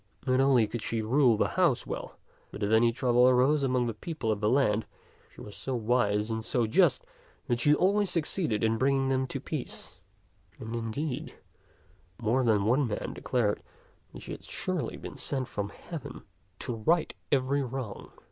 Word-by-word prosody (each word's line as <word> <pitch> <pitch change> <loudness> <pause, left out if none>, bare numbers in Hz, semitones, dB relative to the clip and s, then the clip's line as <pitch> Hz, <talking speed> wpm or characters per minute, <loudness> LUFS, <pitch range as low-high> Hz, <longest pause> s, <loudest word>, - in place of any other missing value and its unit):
Not 130 -1 +2
only 135 -4 +5
could 110 +2 -5
she 115 0 -2
rule 120 0 +4
her - - +2
house 170 -9 +1
well, - - -6 0.3
but 105 - -6
if 100 - 0
any 115 +1 +5
trouble 125 0 +4
arose 130 +4 +3
among 125 -2 +1
the 115 - -2
people 120 -1 -3
of 105 - -1
the 105 0 +1
land, 110 -5 +2 0.4
she - - -14
was 105 - -10
so 130 - -4
wise 110 -2 +1
and 110 0 -2
so 120 +1 +1
just 185 - +3 0.4
that 120 -3 0
she 150 +4 +4
always 200 +3 +2
succeeded 155 - -1
in 110 0 +2
bringing 135 0 +2
them 130 0 +1
to - - -3
peace; - - -5 0.6
and, 115 +1 -6
indeed, 125 +5 -4 0.8
more 120 +3 +1
than 105 -4 +2
one 125 +4 +3
man 105 - -4
declared 115 -5 0 0.5
that - - -10
she - - -8
had - - -7
surely - - -3
been - - -9
sent 130 -3 -1
from 100 -1 -4
heaven 165 - -9 0.3
to 120 - -4
right 155 +9 +1 0.2
every 140 +1 +2
wrong. 130 -5 -5
125 Hz, 175 wpm, -29 LUFS, 110-135 Hz, 0.8 s, only